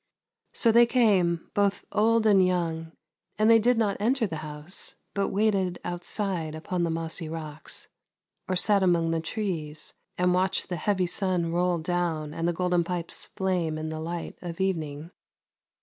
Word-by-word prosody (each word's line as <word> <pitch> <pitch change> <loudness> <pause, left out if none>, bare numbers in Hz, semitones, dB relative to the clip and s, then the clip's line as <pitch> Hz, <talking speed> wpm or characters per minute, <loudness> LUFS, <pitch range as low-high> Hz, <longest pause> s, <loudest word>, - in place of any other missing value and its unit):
So 230 - +3
they 235 +1 +6
came 195 -9 +2
both 200 -1 +1
old 225 +1 +3
and 200 -3 +6
young, 165 -3 -1 0.5
and 215 +2 +5
they 225 - +7
did 240 +2 +3
not 210 -3 +1
enter 235 +3 +2
the 165 -6 -4
house, 150 +3 -5 0.2
but 200 -1 0
waited 195 -3 +1
outside, 175 -2 -2
upon 175 +3 -3
the 170 - +1
mossy 165 0 -2
rocks, 155 -1 -6 0.6
or 185 - 0
sat 200 +2 +4
among 170 -3 +3
the 165 -1 0
trees, 160 -5 -4 0.2
and 180 0 +3
watched 185 +1 +1
the 175 - -2
heavy 185 +2 +1
sun 180 -2 -1
roll 175 +1 +1
down 165 -2 -1
and 165 +1 -1
the - - +3
Golden 180 0 +1
Pipes 170 -1 -3
flame 180 -5 0
in 155 0 -4
the 160 0 -4
light 170 +1 -5
of 170 -1 -6
evening. 160 -4 -2
175 Hz, 165 wpm, -27 LUFS, 165-195 Hz, 0.6 s, they